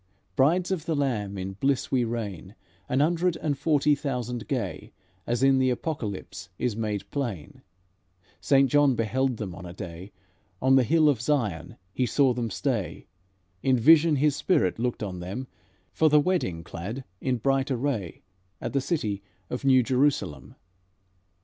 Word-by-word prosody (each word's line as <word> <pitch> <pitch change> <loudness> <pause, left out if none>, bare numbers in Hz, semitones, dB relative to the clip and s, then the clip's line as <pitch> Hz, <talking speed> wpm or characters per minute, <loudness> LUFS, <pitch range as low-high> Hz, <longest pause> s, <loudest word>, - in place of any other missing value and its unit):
Brides 175 +7 +3
of 170 -5 -2
the 165 - +1
Lamb 110 -8 -1
in 95 +1 -4
bliss 135 +7 0
we 130 -2 +2
reign, 105 -5 -5 0.3
An 130 +2 +2
hundred 170 +3 +2
and 150 -3 -1
forty 150 0 +2
thousand 125 -5 -3
gay, - - -4 0.3
As 120 +2 0
in 135 -1 +5
the 130 0 +3
Apocalypse 110 - -4
is 125 -4 -1
made 105 -3 -3
plain, 115 - -4 0.8
Saint 135 -3 +3
John 145 -3 +4
beheld 125 +3 0
them 100 -5 -5
on 90 - -10
a 85 - -8
day; 90 0 -8 0.5
On 130 +1 +4
the 135 - +6
hill 155 +4 +3
of 135 -6 +2
Zion 110 - -1 0.2
he 125 - 0
saw 135 0 +3
them 120 -2 -2
stay, 95 - -2 0.6
In 130 -1 +3
vision 155 +5 +6
his 145 0 +2
spirit 95 - +1
looked 120 -2 -1
on 95 -3 -5
them, 95 +9 -5 0.5
For 160 - +3
the 150 0 +6
wedding 145 - 0
clad 105 +12 -6 0.2
in 130 -2 0
bright 135 +3 +1
array, 120 - -2 0.4
At - - -5
the 140 - +2
city 110 - -2 0.3
of 125 - -4
New 130 -2 +5
Jerusalem." 135 +3 0
130 Hz, 160 wpm, -26 LUFS, 105-145 Hz, 0.8 s, the